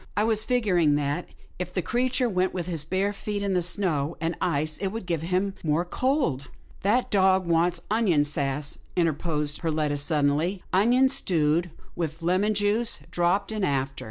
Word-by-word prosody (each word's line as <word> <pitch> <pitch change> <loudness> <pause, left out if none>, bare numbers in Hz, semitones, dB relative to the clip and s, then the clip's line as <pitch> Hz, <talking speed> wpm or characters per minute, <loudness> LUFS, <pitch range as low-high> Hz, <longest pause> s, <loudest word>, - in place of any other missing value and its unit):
I 210 - +3
was 220 -1 +2
figuring 185 - +2
that, 145 +3 -1 0.3
if 180 0 -4
the 185 -1 -2
creature 250 - +1
went 185 -3 0
with 175 -2 -2
his 165 -4 -2
bare 190 +4 0
feet 205 0 -4
in 200 -1 0
the 180 - +2
snow 170 -4 -1
and 165 +1 -2
ice, 155 -3 0
it 195 - -1
would 215 +1 -5
give 170 -3 -1
him 185 +4 0
more 160 +2 +1
cold." 255 - 0 0.2
" - - -26
That 225 +6 +1
dog 190 -2 +4
wants 170 +1 +1
onion 200 -10 +3
sass," 145 -1 -2 0.2
interposed 155 -3 0
Per 165 - -2
letta, 150 -2 0
suddenly, 150 +5 +1
" - - -29
onions 245 +7 +4
stewed, 165 0 +1 0.3
with 165 -1 -4
lemon 190 +5 +2
juice 210 +3 +1
dropped 180 +4 +1
in 215 -2 -2
after. 135 -4 -1
175 Hz, 180 wpm, -26 LUFS, 155-200 Hz, 0.3 s, dog